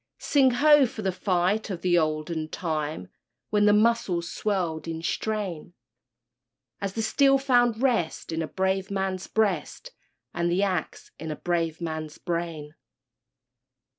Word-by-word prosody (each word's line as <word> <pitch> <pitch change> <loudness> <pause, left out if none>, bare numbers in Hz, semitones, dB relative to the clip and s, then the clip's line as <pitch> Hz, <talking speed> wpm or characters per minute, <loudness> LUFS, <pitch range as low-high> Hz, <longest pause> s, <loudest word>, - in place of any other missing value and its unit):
Sing 275 -3 +3
ho! 285 +2 +5
for 230 -3 -8
the 190 - +1
fight 185 +3 0
of 185 -4 -5
the 180 -1 +3
olden 155 0 -1
time, 155 - -3 0.4
When 210 -1 +3
the 210 - +6
muscles 210 -5 +2
swelled 175 -7 -2
in 165 0 -5
strain, 185 -4 -3 1.0
As 195 -1 -3
the 225 - -2
steel 275 +5 +4
found 245 -3 +2
rest 220 -12 0
in 160 0 -2
a 160 - -2
brave 190 +1 -1
man's 190 -1 -2
breast 220 - -1 0.4
And 170 0 0
the 180 +3 +1
axe 185 -5 -3
in 160 - -6
a 155 - -3
brave 165 -1 -1
man's 155 -2 -5
brain! 165 -4 -4
185 Hz, 140 wpm, -26 LUFS, 165-215 Hz, 1.0 s, the